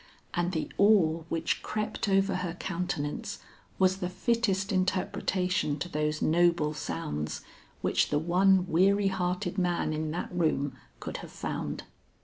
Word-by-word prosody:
And 175 +1 0
the 160 -4 -2
awe 185 -6 +5
which 165 0 -1
crept 215 -1 -2
over 195 -1 +3
her 180 -2 -3
countenance 170 -5 -3 0.4
was 190 0 +3
the 180 -2 -3
fittest 195 0 0
interpretation 185 -2 0
to 150 - -3
those 150 -2 -1
noble 170 -2 +3
sounds, 75 - -4 0.4
which - - +2
the 145 - +2
one 180 +4 +4
weary 195 +3 +3
hearted 180 0 -1
man 175 -3 +1
in 155 0 -2
that 165 +3 -3
room 155 -5 0 0.2
could - - -5
have - - -9
found. - - -4
180 Hz, 135 wpm, -29 LUFS, 160-190 Hz, 0.4 s, awe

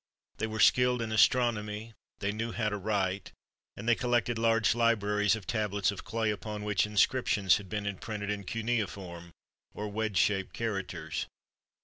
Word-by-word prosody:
They 110 - -1
were 110 0 -5
skilled 125 +1 +5
in 110 - -4
astronomy, 110 -2 +2 0.3
they 100 0 0
knew 115 +2 -3
how 110 -3 0
to 105 - -3
write, 100 -1 -1 0.4
and - - -7
they 120 - +6
collected 120 -1 0
large 115 -1 +3
libraries 105 -3 +2
of 110 -4 -8
tab 105 -4 -1
lets 100 +1 +2
of 100 - -8
clay 110 -1 0
upon 105 0 -5
which 105 0 +1
inscriptions 105 -2 +3
had 100 -3 -10
been 105 +1 -3
imprinted 105 +1 -4
in 105 -1 -3
cuneiform, 100 -7 -3 0.4
or 105 0 -4
wedge 105 -1 -2
shaped 95 +2 +1
characters. 105 -5 -3
105 Hz, 160 wpm, -30 LUFS, 100-115 Hz, 0.4 s, they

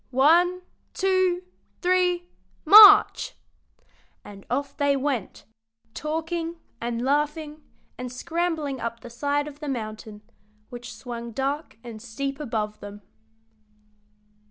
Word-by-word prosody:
One, 345 +7 +3 0.3
two, 370 -2 +1 0.4
three, 360 -1 +1 0.4
march!" 410 +4 +8 0.9
And 195 -1 -12
off 280 +3 -2
they 285 -2 +1
went, 265 -7 -3 0.5
talking 325 +2 -3 0.3
and 235 0 -3
laughing 300 +2 -1 0.4
and 250 -1 -5
scrambling 320 -1 -3
up 230 0 -5
the 240 - -11
side 285 +4 -1
of 290 -1 -11
the 300 -2 -5
mountain, 215 -3 -6 0.5
which 240 -2 -9
swung 235 -2 -8
dark 275 +2 -3
and 230 -3 -9
steep 275 +5 -5
above 215 -6 -3
them. 205 0 -10
280 Hz, 110 wpm, -25 LUFS, 235-325 Hz, 0.9 s, march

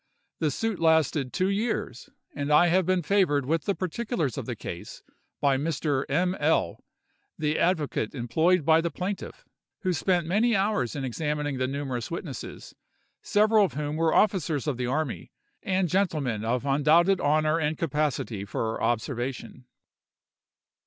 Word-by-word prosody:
The 155 - +1
suit 220 - -2
lasted 160 -5 +2
two 185 0 0
years, 200 - -2 0.2
and 145 0 -3
I 175 +4 +6
have 180 +1 +2
been 185 -2 +1
favored 150 -7 +2
with 160 +2 0
the 200 - 0
particulars 185 - -2
of - - -5
the - - -3
case - - -8 0.4
by 140 -2 +2
Mr. 145 -2 -1
M—— 180 +6 +1
L——, 145 - +1 0.5
the 155 0 0
advocate 150 -9 0
employed 160 +8 +1
by 160 0 +5
the 170 - -1
plaintiff, 195 - -5 0.4
who 185 -3 0
spent 175 +1 +1
many 220 +7 +2
hours 195 - 0
in 140 - -3
examining 150 +1 -2
the 130 - +1
numerous 135 -4 -4
witnesses, 165 -5 -7 0.5
several 215 +1 +4
of 185 - -1
whom 150 0 -3
were 160 0 +2
officers 175 -9 +2
of 145 -5 -1
the 125 -1 -2
army, 130 - -3 0.3
and 185 -1 0
gentlemen 150 - 0
of 120 +3 -1
undoubted 160 +7 +3
honor 155 +2 +2
and 155 -1 -1
capacity 145 -9 -1
for 110 +2 -3
observation. 125 +1 -3
155 Hz, 150 wpm, -27 LUFS, 135-180 Hz, 0.5 s, I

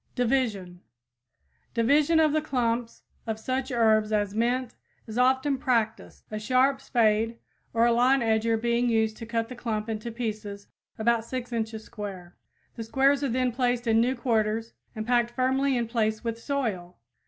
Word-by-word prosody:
DIVISION 225 -8 -1 0.9
Division 290 +7 +3
of 310 -2 +3
the 310 - +2
clumps 240 -5 -2 0.2
of 220 -1 -3
such 260 +3 -2
herbs 220 -2 +3
as 205 -2 0
mint 240 +3 0 0.3
is 220 - -8
often 260 +2 +2
practiced, 230 -4 -1
a 215 - -3
sharp 260 +4 +2
spade 225 -3 +1 0.3
or 230 +1 +3
a 235 - +4
lawn 255 +3 +4
edger 225 0 +1
being 235 +1 +1
used 220 -1 +1
to 230 - -8
cut 230 -1 -1
the 255 - -8
clump 220 -3 -3
into 220 +1 -4
pieces 215 -3 -5 0.3
about 230 +1 +2
6 245 +1 -5
inches 220 -1 -3
square. 195 -7 -8 0.4
The 230 - -6
squares 275 +4 +2
are 275 - 0
then 250 +1 +1
placed 245 0 0
in 225 -1 +3
new 250 +3 +1
quarters 225 -2 -1 0.2
and 215 0 -4
packed 240 0 +2
firmly 260 +2 +1
in 235 -1 -1
place 220 -1 -1
with 230 -1 -4
soil. 215 -12 -3
235 Hz, 165 wpm, -27 LUFS, 220-255 Hz, 0.9 s, a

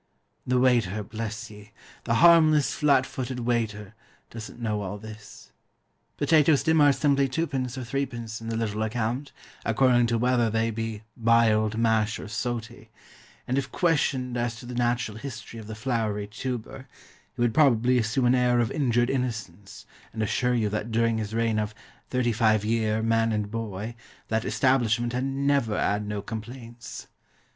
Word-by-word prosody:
The 125 0 +2
waiter, 115 -5 +2
bless 110 +1 -6
ye! 105 0 -14 0.3
the 115 - +1
harmless, 155 -1 +5
flat 140 -3 +3
footed 130 -1 -5
waiter, 110 -4 -2 0.4
doesn't 115 +1 -9
know 105 -3 -2
all 100 +1 -4
this. 110 -1 -12 0.7
Potatoes 155 -2 +4
to 160 - +2
him 160 -1 +4
are 145 -1 +7
simply 140 -1 +2
2d. 135 -4 -2
or - - -4
3d. 120 -4 -4
in 115 - -6
the 115 - -2
little 110 -2 -2
account, 120 +5 -2 0.3
according 120 +1 +3
to 115 0 +1
whether 120 -1 +2
they 115 +1 0
be 115 -1 -4
"biled, 110 -2 +3
mash, 115 -1 +2
or - - -8
soty"; 115 0 -5 0.6
and 130 +2 +1
if 130 -2 -5
questioned 135 -7 0
as 120 0 -1
to 120 - -11
the 125 - -7
natural 120 -2 -1
history 120 -3 -8
of 110 - -10
the 110 - -6
floury 110 -3 -1
tuber, 125 +4 -6 0.5
he - - -16
would 120 -2 +1
probably 125 -4 +4
assume 115 +3 0
an 120 - +4
air 125 -1 +3
of 115 -2 +1
injured 120 -5 +1
innocence, 110 -8 -4 0.3
and 110 - -2
assure 125 +4 +1
you 110 -3 +1
that 105 +2 -3
during 115 0 +1
his 110 0 -4
reign 115 -1 +1
of 105 0 -3 0.3
"thirty 125 -2 +1
five 110 -2 +2
year, 110 -1 0
man 115 0 +2
and 105 -1 -2
boy," 110 -1 -4 0.4
that 110 0 0
establishment 120 -3 +1
had 125 +1 -1
"never 135 -5 0
'ad 105 +1 0
no 105 -1 -4
complaints." 120 +1 -8
115 Hz, 165 wpm, -26 LUFS, 110-125 Hz, 0.7 s, are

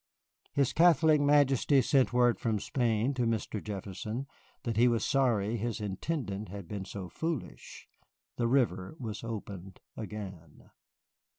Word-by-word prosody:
His 140 -2 +2
Catholic 160 -2 +5
Majesty 145 -1 +4
sent 135 0 +3
word 120 -1 +3
from 110 -2 0
Spain 115 +3 0
to 125 -3 0
Mr. 110 -2 -2
Jefferson 105 +4 -5 0.4
that 115 -2 -2
he 120 +3 +5
was 115 -2 +1
sorry 120 -5 +2
his 115 +1 -3
Intendant 105 - -3
had 100 -2 -8
been 100 -1 -5
so 95 -1 -6
foolish. 160 - -5 0.5
The 120 - 0
River 115 - +1
was 110 -4 -6
opened 100 -4 -7 0.2
again. 95 -8 -8
115 Hz, 130 wpm, -31 LUFS, 100-135 Hz, 0.5 s, Catholic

